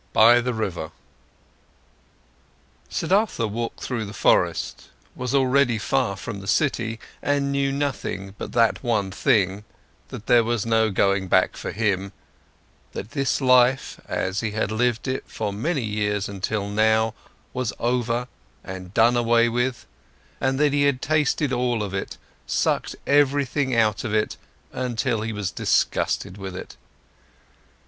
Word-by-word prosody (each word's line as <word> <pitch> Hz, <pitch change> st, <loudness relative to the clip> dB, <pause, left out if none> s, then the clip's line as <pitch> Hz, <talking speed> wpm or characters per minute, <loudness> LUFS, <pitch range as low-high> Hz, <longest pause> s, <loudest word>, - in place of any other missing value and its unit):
BY 120 Hz, +2 st, +7 dB
THE 125 Hz, +1 st, -2 dB
RIVER 90 Hz, -7 st, -3 dB, 2.0 s
Siddhartha 195 Hz, -, +1 dB
walked 115 Hz, +2 st, -4 dB
through 120 Hz, -4 st, -3 dB
the 100 Hz, +1 st, -9 dB
forest, -, -, +1 dB, 0.3 s
was 125 Hz, +2 st, -2 dB
already 130 Hz, -2 st, +3 dB
far 100 Hz, -2 st, 0 dB
from 95 Hz, +1 st, -6 dB
the 100 Hz, -, -10 dB
city, 115 Hz, -6 st, 0 dB, 0.2 s
and 140 Hz, -1 st, 0 dB
knew 140 Hz, 0 st, +1 dB
nothing 135 Hz, -8 st, -3 dB
but -, -, -5 dB
that 115 Hz, +1 st, +2 dB
one 105 Hz, -6 st, 0 dB
thing, 100 Hz, -3 st, +1 dB, 0.4 s
that 110 Hz, -, -9 dB
there 120 Hz, -1 st, +5 dB
was 115 Hz, -2 st, -1 dB
no 110 Hz, -1 st, +3 dB
going 100 Hz, -1 st, +1 dB
back 95 Hz, +1 st, +3 dB
for -, -, -5 dB
him, 100 Hz, -3 st, -1 dB, 0.8 s
that 100 Hz, -, -6 dB
this 140 Hz, -3 st, 0 dB
life, 125 Hz, +1 st, +3 dB
as 95 Hz, +2 st, -1 dB
he 110 Hz, -, -1 dB
had 110 Hz, -1 st, -1 dB
lived 120 Hz, +2 st, 0 dB
it 130 Hz, 0 st, -2 dB
for 105 Hz, -2 st, -4 dB
many 140 Hz, -, -1 dB
years 105 Hz, -2 st, -1 dB
until 100 Hz, +1 st, -3 dB
now, 110 Hz, +1 st, +2 dB, 0.4 s
was 125 Hz, -3 st, -1 dB
over 120 Hz, 0 st, 0 dB, 0.4 s
and 95 Hz, 0 st, -8 dB
done 120 Hz, +2 st, +5 dB
away 120 Hz, 0 st, +3 dB
with, 120 Hz, +1 st, -1 dB, 0.5 s
and 135 Hz, 0 st, 0 dB
that 145 Hz, -1 st, +3 dB
he 145 Hz, -, +2 dB
had 140 Hz, -3 st, +2 dB
tasted 150 Hz, -2 st, +1 dB
all 120 Hz, -3 st, 0 dB
of 100 Hz, -2 st, -5 dB
it, 95 Hz, -, -4 dB, 0.3 s
sucked -, -, 0 dB
everything 140 Hz, -2 st, +2 dB
out 110 Hz, -3 st, +2 dB
of 110 Hz, -2 st, -2 dB
it 105 Hz, 0 st, 0 dB, 0.4 s
until 120 Hz, -2 st, -1 dB
he 110 Hz, +1 st, -3 dB
was 105 Hz, -4 st, -3 dB
disgusted 90 Hz, -, 0 dB
with 95 Hz, -2 st, -6 dB
it. -, -, -8 dB
115 Hz, 145 wpm, -24 LUFS, 105-130 Hz, 2.0 s, BY